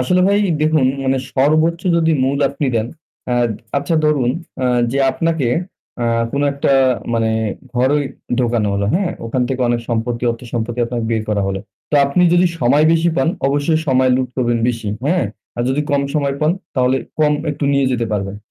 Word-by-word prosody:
আসলে 180 Hz, +9 st, +2 dB
ভাই 200 Hz, +1 st, +3 dB, 0.2 s
দেখুন 155 Hz, -3 st, +3 dB, 0.2 s
মানে 130 Hz, 0 st, +1 dB, 0.2 s
সর্বোচ্চ 155 Hz, +5 st, +2 dB, 0.2 s
যদি 165 Hz, -1 st, +2 dB
মূল 135 Hz, +1 st, 0 dB
আপনি 140 Hz, +1 st, -2 dB
দেন 110 Hz, 0 st, 0 dB, 0.5 s
আ -, -, +2 dB, 0.4 s
আচ্ছা 165 Hz, +4 st, -2 dB
ধরুন 145 Hz, -5 st, +2 dB, 0.6 s
যে 135 Hz, -, 0 dB
আপনাকে 160 Hz, -2 st, 0 dB, 0.5 s
আ -, -, 0 dB, 0.3 s
কোন 140 Hz, -, 0 dB
একটা 140 Hz, 0 st, 0 dB, 0.4 s
মানে 115 Hz, -1 st, +1 dB, 0.4 s
ঘরেই 130 Hz, +4 st, +2 dB, 0.4 s
ঢোকানো 115 Hz, -3 st, +1 dB
হলো। 100 Hz, 0 st, 0 dB
হ্যাঁ? 185 Hz, 0 st, +1 dB, 0.2 s
ওখান 125 Hz, +2 st, -1 dB
থেকে 130 Hz, -1 st, -2 dB
অনেক 120 Hz, 0 st, +1 dB
সম্পত্তি 115 Hz, +1 st, -2 dB
অর্থসম্পত্তি 115 Hz, 0 st, -4 dB
আপনাকে 120 Hz, -1 st, -3 dB
বের 110 Hz, -1 st, 0 dB
করা 105 Hz, -2 st, 0 dB
হলো। 95 Hz, 0 st, -3 dB, 0.3 s
তো -, -, 0 dB
আপনি 140 Hz, +6 st, +1 dB
যদি 175 Hz, +1 st, +4 dB
সময় 135 Hz, +5 st, +4 dB
বেশি 165 Hz, +1 st, +2 dB
পান 135 Hz, -, +2 dB, 0.2 s
অবশ্যই 145 Hz, +3 st, +1 dB
সময় 130 Hz, -1 st, +3 dB
লুট 130 Hz, -1 st, -1 dB
করবেন 120 Hz, -2 st, +1 dB
বেশি। 115 Hz, -3 st, -3 dB, 0.2 s
হ্যাঁ? 170 Hz, -2 st, +2 dB, 0.3 s
আর 120 Hz, -, -1 dB
যদি 135 Hz, +3 st, 0 dB
কম 140 Hz, -1 st, +2 dB
সময় 140 Hz, -2 st, 0 dB
পান 155 Hz, +2 st, +3 dB, 0.2 s
তাহলে 130 Hz, 0 st, +2 dB, 0.2 s
কম 150 Hz, -1 st, +3 dB, 0.2 s
একটু 145 Hz, 0 st, -4 dB
নিয়ে 140 Hz, 0 st, +2 dB
যেতে 120 Hz, -2 st, -1 dB
পারবেন। 100 Hz, -1 st, -2 dB
130 Hz, 175 wpm, -18 LUFS, 120-150 Hz, 0.6 s, যদি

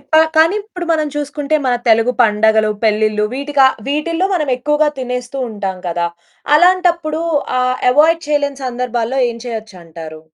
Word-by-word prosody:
ఇప్ప -, -, -32 dB, 0.2 s
కానీ 325 Hz, +4 st, +4 dB
ఇప్పుడు 365 Hz, -4 st, -8 dB
మనం 310 Hz, -2 st, +1 dB
చూసుకుంటే 295 Hz, +1 st, -2 dB
మన 250 Hz, -, +2 dB
తెలుగు 230 Hz, +2 st, +3 dB
పండగలు, 220 Hz, 0 st, +3 dB
పెళ్లిలు 215 Hz, 0 st, +1 dB
వీటిక 280 Hz, +1 st, -2 dB, 0.3 s
వీటిల్లో 330 Hz, +5 st, -1 dB
మనమెక్కువగా 295 Hz, 0 st, +1 dB
తినేస్తూ 250 Hz, +1 st, -4 dB
ఉంటాం 195 Hz, -3 st, -4 dB
గదా! 170 Hz, 0 st, -1 dB, 0.5 s
అలాంటప్పుడు 345 Hz, -3 st, +2 dB, 0.4 s
ఆ -, -, +2 dB, 0.3 s
అవాయిడ్ 320 Hz, +5 st, +3 dB
చేయలేని 285 Hz, -2 st, -1 dB
సందర్భాల్లో 245 Hz, 0 st, -2 dB
ఏం 235 Hz, -, -8 dB
చేయొచ్చంటారు? 170 Hz, -9 st, -8 dB
255 Hz, 130 wpm, -16 LUFS, 220-305 Hz, 0.5 s, కానీ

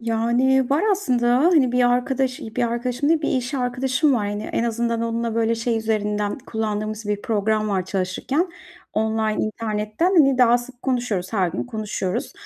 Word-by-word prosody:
Yani, 240 Hz, +3 st, +1 dB
var 285 Hz, +4 st, +2 dB
aslında, 245 Hz, -10 st, +2 dB
hani, 295 Hz, -5 st, +4 dB
bir 250 Hz, -1 st, +3 dB
arkadaş 255 Hz, +1 st, 0 dB
bir 225 Hz, +3 st, -4 dB
arkadaşım 240 Hz, +4 st, -1 dB
değil, 320 Hz, -1 st, +2 dB
bir -, -, 0 dB
iş 255 Hz, +2 st, -1 dB
arkadaşım 260 Hz, +3 st, +1 dB
var. 215 Hz, -4 st, 0 dB
Hani, 205 Hz, +1 st, -3 dB
en 230 Hz, -, -1 dB
azından 235 Hz, 0 st, -1 dB
onunla 230 Hz, 0 st, -2 dB
böyle 230 Hz, 0 st, +1 dB
şey 230 Hz, 0 st, -1 dB
üzerinden 210 Hz, -1 st, -1 dB
kullandığımız 215 Hz, -3 st, -3 dB
bir 205 Hz, 0 st, -1 dB
program 215 Hz, 0 st, 0 dB
var 190 Hz, -3 st, 0 dB
çalışırken 195 Hz, -, -1 dB, 0.4 s
online 220 Hz, 0 st, 0 dB
internetten, 215 Hz, +6 st, -2 dB
hani, 275 Hz, -5 st, +5 dB
daha 240 Hz, -1 st, +5 dB
sık 245 Hz, 0 st, -12 dB
konuşuyoruz, 240 Hz, -8 st, -1 dB
her 190 Hz, -5 st, +1 dB
gün 170 Hz, -, -3 dB
konuşuyoruz 215 Hz, -5 st, -3 dB
230 Hz, 165 wpm, -22 LUFS, 215-255 Hz, 0.4 s, hani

